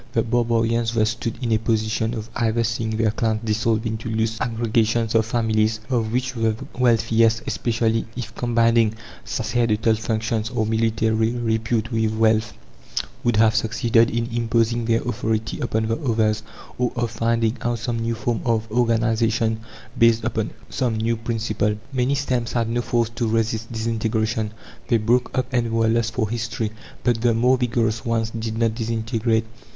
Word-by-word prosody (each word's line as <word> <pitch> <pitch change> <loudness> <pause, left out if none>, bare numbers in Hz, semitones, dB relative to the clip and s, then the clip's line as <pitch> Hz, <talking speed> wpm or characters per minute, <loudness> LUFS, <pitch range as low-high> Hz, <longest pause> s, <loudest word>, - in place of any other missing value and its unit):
The 115 - +2
barbarians 115 -1 +1
thus 110 -1 +3
stood 115 -1 -4
in 115 - 0
a 110 - +3
position 110 +1 0
of 110 -1 -5
either 115 0 +1
seeing 110 -1 -1
their 110 -1 +2
clans 110 -1 -1
dissolved 110 +1 0
into 110 0 -3
loose 110 0 -1
aggregations 115 -1 +1
of 110 -1 +3
families, 110 -1 +1
of 115 -3 0
which 130 +2 -1
the 115 -2 0 0.2
wealthiest, 115 -2 +3
especially 115 -1 0
if 115 -2 -5
combining 115 -2 +2 0.3
sacerdotal 115 -2 +1
functions 110 0 -1
or 115 -3 -1
military 110 0 +1
repute 115 -1 -1
with 110 -1 0
wealth, 110 0 +2 0.7
would 120 -2 +2
have 110 0 +5
succeeded 115 +1 +3
in 115 0 -1
imposing 115 0 +1
their 115 0 +2
authority 110 -2 -2
upon 110 0 0
the 115 +1 0
others; 110 -6 +1 0.4
or 125 -1 +1
of 120 -1 -1
finding 115 0 +1
out 120 0 0
some 115 +1 -3
new 115 0 -1
form 120 0 -2
of 115 -2 0
organization 115 -1 +1 0.4
based 115 -1 +5
upon - - -1 0.2
some 120 -3 0
new 115 +1 +1
principle. 110 -2 -1 0.2
Many 130 +2 +1
stems 125 -4 -1
had 115 -2 0
no 120 +1 0
force 120 -1 0
to 120 - 0
resist 115 0 -1
disintegration: 110 -1 -1 0.3
they 120 - +3
broke 120 +3 +2
up 130 - +2
and 120 -2 +1
were 115 0 +2
lost 115 0 +1
for 110 -4 +1
history. 110 -1 -3 0.3
But 120 -2 +1
the 120 -1 +3
more 125 +3 +4
vigorous 115 -3 0
ones 115 -1 0
did 110 -1 -4
not 115 -1 +2
disintegrate. 115 0 0
115 Hz, 160 wpm, -22 LUFS, 110-115 Hz, 0.7 s, have